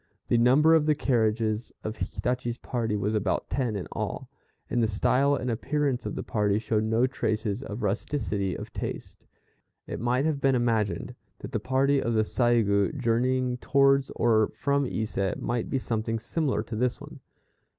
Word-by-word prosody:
The 120 - +4
number 140 +7 +5
of 155 -2 +4
the 155 - +4
carriages 110 -4 0
of 110 +1 -4
Hitachi's 120 +5 -2
party 115 -5 -2
was 105 +1 -1
about 105 -3 -1
ten 125 -6 0
in 95 - -4
all, - - -4 0.4
and 120 - 0
the 115 - +3
style 130 +7 +2
and 125 -2 -2
appearance 140 +2 -1
of - - -4
the - - -4
party 105 -2 +1
showed 110 0 0
no 115 +3 +3
traces 110 -4 -2
of 110 -2 -6
rusticity 100 -2 -1
of - - -9
taste. - - -6 0.6
It - - -5
might 125 +4 +1
have 150 -3 0
been 135 -1 +3
imagined 115 -4 0 0.2
that - - -8
the - - -1
party 135 +1 +2
of 115 0 -1
the 110 - +3
Saigû 115 +1 +2
journeying 125 +1 +1
towards 135 +1 +3
or 110 -2 +3
from 140 -1 +1
Ise, 105 -4 -2
might 120 -1 -2
be 135 - 0
something 115 -2 -2
similar 140 +5 -1
to 115 - -6
this 125 +2 0
one. - - -11
120 Hz, 170 wpm, -27 LUFS, 110-130 Hz, 0.6 s, number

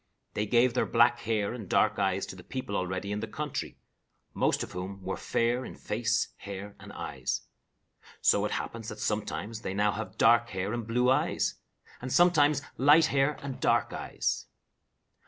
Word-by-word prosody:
They 105 0 -1
gave 120 +2 +4
their 125 - +1
black 115 0 +4
hair 110 -1 -1
and 110 -6 -8
dark - - +3
eyes 95 0 +1
to - - -8
the 90 - -12
people 130 -4 -5
already 95 +2 -2
in 105 - -1
the 110 - -4
country, 150 +5 -4 0.6
most - - +1
of - - -8
whom 95 +2 -6
were 95 +1 -2
fair 120 +2 0
in - - -8
face, 115 +2 0
hair, 100 +1 -7
and - - -11
eyes. - - -3 0.8
So - - +4
it - - -2
happens 115 -1 -4
that 110 - -7
sometimes 105 +1 -3
they 95 -3 -4
now 105 +1 +3
have 110 +2 -6
dark 120 +1 +5
hair 95 +2 -3
and 120 -2 -3
blue 125 +2 +3
eyes, 135 - +1 0.5
and 130 +1 -5
sometimes 150 -5 +4
light 150 +4 +6
hair 140 +1 +2
and 140 -2 -5
dark - - +2
eyes. - - -2
115 Hz, 175 wpm, -29 LUFS, 100-125 Hz, 0.8 s, light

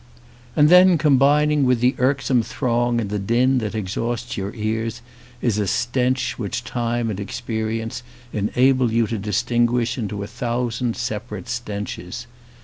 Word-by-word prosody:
And 150 -1 +5
then 180 0 +7
combining 150 0 +4
with 125 -2 +3
the 125 +2 +3
irksome 130 -1 +2
throng 120 0 0
and 105 -3 -3
the 105 - -1
din 125 +6 +2
that 110 -2 -4
exhausts 115 +4 -3
your 100 -1 -3
ears 110 +2 -3 0.4
is 110 -4 +1
a 105 - 0
stench 125 +4 0
which 100 -4 -3
time 120 -1 -1
and 100 - -5
experience 110 +1 -3 0.3
enable 125 +4 +2
you 115 0 +2
to 110 -1 -3
distin~ 120 +4 +1
guish 120 +1 -1
into 105 -2 -3
a - - -4
thousand 120 0 -2
separate 105 -3 -4
stenches. 105 -2 -5
120 Hz, 145 wpm, -22 LUFS, 110-125 Hz, 0.4 s, then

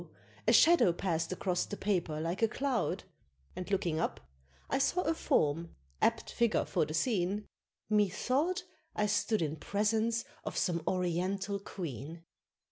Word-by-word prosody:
a - - +6
shadow 335 - +6
pass'd 170 -1 -1
across 180 -1 0
the 205 - -5
paper 175 -6 0
like 170 +5 -2
a 225 - +5
cloud, 260 +1 -1 0.5
And 180 +1 -5
looking 175 -5 0
up - - -1 0.5
I 270 - 0
saw 345 +6 +2
a 325 - +2
form, 165 - +1 0.3
apt - - +1
figure 235 -2 +2
for - - +1
the 155 - -4
scene, 200 +1 0 0.4
Methought 255 - +1 0.3
I 210 - +2
stood 210 -1 +1
in 155 0 -2
presence 220 +5 0 0.2
of - - -4
some 170 -2 +1
oriental 185 +2 0
queen! 165 - -6
195 Hz, 140 wpm, -32 LUFS, 170-220 Hz, 0.5 s, a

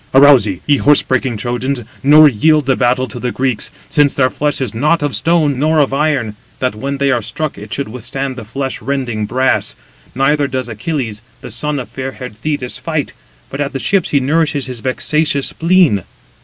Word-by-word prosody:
"Arouse 135 -5 +7
ye, 95 -4 -4
ye 145 -1 +3
horse 145 +1 +4
breaking 130 -3 -1
Trojans, 125 +3 -2 0.2
nor 150 +3 +7
yield 150 +4 +2
the 135 -1 +2
battle 130 +1 +1
to 105 - -8
the 125 - -2
Greeks; 130 -3 -1 0.2
since 145 -2 +2
their 130 -2 +2
flesh 150 0 0
is 130 -6 -3
not 150 +7 +1
of 145 -2 -1
stone, 145 +3 +1
nor 155 +2 +2
of 140 -3 +2
iron, 135 -7 0 0.2
that 130 -2 -1
when 140 +6 -4
they 140 0 +1
are 120 - +1
struck, 120 +7 -4
it 105 +1 -11
should 140 - -2
withstand 130 +4 -4
the 120 - -7
flesh 135 +5 -4
rending 120 -5 -2
brass; 130 +3 0 0.4
neither 140 +2 +2
does 130 -2 -3
Achilles, 115 -1 -4 0.2
the - - -8
son 150 -1 -1
of 130 - -5
fair 130 0 -6
haired 125 -4 -9
Thetis, 130 +1 -3
fight, - - -3 0.4
but 135 - -4
at 140 - -2
the 135 - -3
ships 195 +5 +1
he 140 - +2
nourishes 150 +1 0
his 125 -2 -7
vexatious 140 +3 +1
spleen." 165 - +2
135 Hz, 195 wpm, -15 LUFS, 125-145 Hz, 0.4 s, Arouse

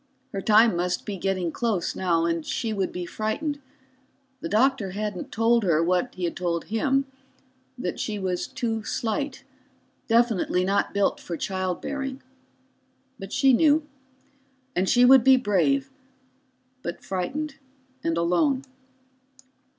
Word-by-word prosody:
Her 195 - -2
time 220 0 +5
must 180 +1 -1
be 205 - -4
getting 185 -2 -1
close 215 -6 -1
now, 170 -3 +1
and 165 -1 -1
she 225 +6 -2
would 195 -3 -1
be 180 -1 -5
frightened. 220 - -3 0.8
The 330 +4 -5
doctor 225 -4 +2
hadn't 205 -2 -4
told 230 +1 +3
her 165 -4 +3
what 180 +8 0
he 185 - -6
had 170 - -1
told 170 -2 -1
him 270 +5 +1 0.7
that 245 - -4
she 215 -2 -2
was 185 -2 -2
too 225 -2 -3
slight, 265 +6 -3 0.6
definitely 225 -6 +2
not 200 +1 +1
built 200 -1 +1
for 170 - -5
child 185 -1 -2
bearing. 270 -2 -4 1.0
But 195 0 -8
she 270 -1 +4
knew. 300 +3 +4 0.9
And 185 +1 +1
she 245 +1 +5
would 260 -1 +7
be 265 +1 +7
brave, 260 +5 +1 0.9
but 170 -7 -6
frightened 270 +11 -3 0.5
and 165 0 0
alone. 255 - +2
210 Hz, 135 wpm, -25 LUFS, 180-260 Hz, 1.0 s, would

